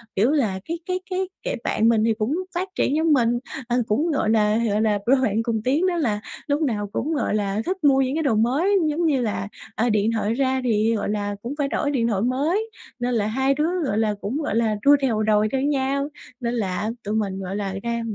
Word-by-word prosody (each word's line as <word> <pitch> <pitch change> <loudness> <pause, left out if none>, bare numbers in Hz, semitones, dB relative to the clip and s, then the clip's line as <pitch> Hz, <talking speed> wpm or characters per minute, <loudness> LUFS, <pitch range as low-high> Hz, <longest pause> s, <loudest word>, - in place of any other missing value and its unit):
kiểu 225 +8 +3
là, 220 -11 +1
cái 335 +1 -4
cái 365 0 -1
cái, 370 0 -2
kiểu, - - -2
bạn 225 +1 +2
mình 225 -2 +3
thì 225 0 +3
cũng 220 +6 -1 0.2
phát 370 +2 -2
triển 280 - +1
giống 320 0 +3
mình, 240 -3 +2 0.3
ờ, 240 0 +1
cũng, 300 +10 +1
gọi 275 -7 0
là 215 -1 +3
gọi 220 -2 +1
là, 210 -2 +2
đôi 260 +2 +4
bạn 225 -2 +1
cùng 225 -2 -1
tiến 295 +9 +2
đó 360 - 0
là 220 -10 0 0.3
lúc 290 +2 0
nào 210 -8 0
cũng, 315 - -1
gọi 285 - 0
là, 205 0 -1
thích 375 +1 -1
mua 270 -2 +5
những 265 +1 0
cái 320 - 0
đồ 265 -7 +2
mới 280 - +2
giống 330 +3 0
như 280 -5 +2
là, 210 -4 -2 0.3
ờ, 235 +2 +1
điện 215 +1 +2
thoại 220 -1 0
ra 260 +1 +1
thì, 225 -1 +2
gọi 210 - -2
là, 205 -1 -2
cũng 240 +5 -4
phải 285 -2 0
đổi 285 +1 -1
điện 240 -5 +1
thoại 205 -4 0
mới, 300 - 0 0.3
nên 245 0 -1
là 215 -3 +1
hai 265 +5 +1
đứa, 300 +4 0 0.2
gọi 210 -6 -1
là, 220 -1 +2
cũng, 230 +8 -2
gọi 295 -8 -2
là, 225 -2 +2
đua 285 +1 +8
theo 225 -5 +1
đòi 215 0 +3
theo 265 -1 0
nhau, 280 0 0 0.3
nên 235 -2 -2
là 210 -1 -1
tụi 210 +1 -2
mình, 200 -3 -1
gọi 190 +1 -4
là, 200 -2 -3
ra 235 0 -1
235 Hz, 245 wpm, -23 LUFS, 215-285 Hz, 0.3 s, đua